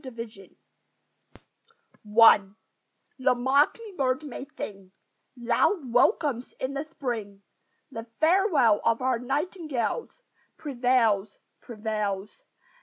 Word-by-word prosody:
THE 260 Hz, -, -7 dB
MINORCAN 225 Hz, -5 st, -10 dB, 1.6 s
I 225 Hz, -2 st, +9 dB, 0.8 s
The 255 Hz, -1 st, +3 dB
mocking 285 Hz, -, +1 dB
bird 260 Hz, +1 st, 0 dB
may 275 Hz, -2 st, -7 dB
sing 195 Hz, -7 st, -9 dB, 0.4 s
Loud 240 Hz, -, 0 dB
welcomes 255 Hz, -, +2 dB
in 260 Hz, +1 st, -4 dB
the 280 Hz, +1 st, -3 dB
Spring; 230 Hz, -10 st, -6 dB, 0.5 s
The 225 Hz, -2 st, -7 dB
farewell 315 Hz, -, +3 dB
of 230 Hz, +2 st, +1 dB
our 255 Hz, -2 st, +1 dB
nightingales 305 Hz, -, -3 dB, 0.3 s
Prevails, 240 Hz, -7 st, +1 dB, 0.2 s
prevails! 210 Hz, -3 st, -4 dB
250 Hz, 95 wpm, -26 LUFS, 225-285 Hz, 1.6 s, I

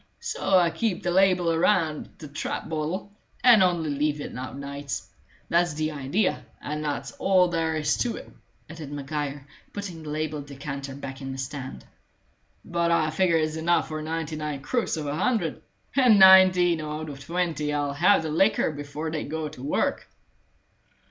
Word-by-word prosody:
So 470 Hz, -, +1 dB
I 175 Hz, -2 st, +4 dB
keep 215 Hz, -4 st, -2 dB
the 175 Hz, -, 0 dB
label 180 Hz, -2 st, +3 dB
around 165 Hz, -2 st, +1 dB
the 155 Hz, -, -9 dB
trap 145 Hz, +2 st, -4 dB
bottle, 160 Hz, +5 st, -3 dB, 0.3 s
and 240 Hz, -4 st, +8 dB
only 175 Hz, -4 st, +2 dB
leave 145 Hz, +1 st, 0 dB
it -, -, -6 dB
out 130 Hz, +1 st, -6 dB
nights. 140 Hz, -7 st, -5 dB, 0.4 s
That's 170 Hz, -2 st, +2 dB
the 155 Hz, 0 st, -1 dB
idea, 150 Hz, +8 st, -1 dB, 0.2 s
and 150 Hz, +1 st, -4 dB
that's 140 Hz, -3 st, -3 dB
all 185 Hz, -2 st, +4 dB
there 165 Hz, -2 st, 0 dB
is 150 Hz, -1 st, +1 dB
to 240 Hz, -, -1 dB
it," -, -, -9 dB, 0.4 s
added 155 Hz, -3 st, -9 dB
Maguire, 145 Hz, -1 st, -4 dB, 0.3 s
putting 190 Hz, -5 st, -6 dB
the 155 Hz, -, -8 dB
labelled 150 Hz, -1 st, -3 dB
decanter 140 Hz, -1 st, -6 dB
back 135 Hz, -1 st, -8 dB
in 135 Hz, 0 st, -5 dB
the 135 Hz, -, -6 dB
stand. 135 Hz, 0 st, -6 dB, 0.8 s
"But 170 Hz, 0 st, 0 dB
I 155 Hz, -2 st, +2 dB
figure 170 Hz, 0 st, +2 dB
it's 155 Hz, 0 st, -1 dB
enough 170 Hz, +2 st, +1 dB
for 155 Hz, 0 st, -4 dB
ninety 160 Hz, 0 st, -3 dB
nine 150 Hz, -2 st, -4 dB
crooks 240 Hz, -, -1 dB
out -, -, -3 dB
of 150 Hz, -, -5 dB
a -, -, -2 dB
hundred, 190 Hz, -3 st, 0 dB, 0.3 s
and 250 Hz, -6 st, +6 dB
nineteen 185 Hz, -3 st, +7 dB
out 155 Hz, +1 st, -5 dB
of 140 Hz, -2 st, -8 dB
twenty 165 Hz, -2 st, -1 dB
'll 145 Hz, -1 st, -1 dB
have 175 Hz, +4 st, +4 dB
their 160 Hz, -, -3 dB
liquor 195 Hz, +1 st, +2 dB
before 145 Hz, +2 st, -5 dB
they 155 Hz, -1 st, -2 dB
go 155 Hz, 0 st, -4 dB
to 150 Hz, -4 st, -12 dB
work." 140 Hz, -, -1 dB
155 Hz, 175 wpm, -26 LUFS, 145-175 Hz, 0.8 s, and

